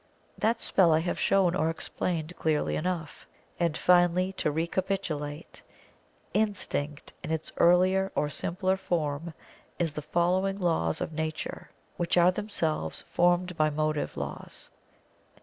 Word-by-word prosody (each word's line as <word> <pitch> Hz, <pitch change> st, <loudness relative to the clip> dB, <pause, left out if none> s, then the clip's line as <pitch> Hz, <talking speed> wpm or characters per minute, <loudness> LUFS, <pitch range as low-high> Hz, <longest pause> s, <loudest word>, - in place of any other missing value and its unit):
That 225 Hz, +1 st, +1 dB
spell 180 Hz, -4 st, +3 dB
I 155 Hz, -, +4 dB
have 175 Hz, -, -2 dB
shown 190 Hz, -3 st, +3 dB
or 160 Hz, -2 st, +1 dB
explained 165 Hz, 0 st, -3 dB
clearly 155 Hz, -2 st, +1 dB
enough. 170 Hz, -2 st, -3 dB, 0.3 s
And, 170 Hz, -3 st, +1 dB
finally, 180 Hz, +1 st, +3 dB
to 185 Hz, -, -1 dB
recapitulate, 165 Hz, -2 st, -3 dB, 0.7 s
Instinct 185 Hz, -8 st, -1 dB
in -, -, -5 dB
its 160 Hz, -1 st, -2 dB
earlier 185 Hz, +2 st, +4 dB
or 150 Hz, -, +1 dB
simpler 185 Hz, +5 st, -1 dB
form 165 Hz, -3 st, -2 dB, 0.4 s
is 165 Hz, -4 st, -1 dB
the 150 Hz, -, -4 dB
following 180 Hz, +5 st, +1 dB
laws 160 Hz, -, 0 dB
of -, -, -3 dB
Nature 155 Hz, 0 st, -4 dB, 0.3 s
which 175 Hz, 0 st, 0 dB
are 175 Hz, +1 st, +6 dB
themselves 170 Hz, -, -2 dB
formed 175 Hz, +1 st, +2 dB
by 155 Hz, -1 st, +3 dB
motive 155 Hz, 0 st, -1 dB
laws. -, -, -7 dB
170 Hz, 130 wpm, -28 LUFS, 155-185 Hz, 0.7 s, are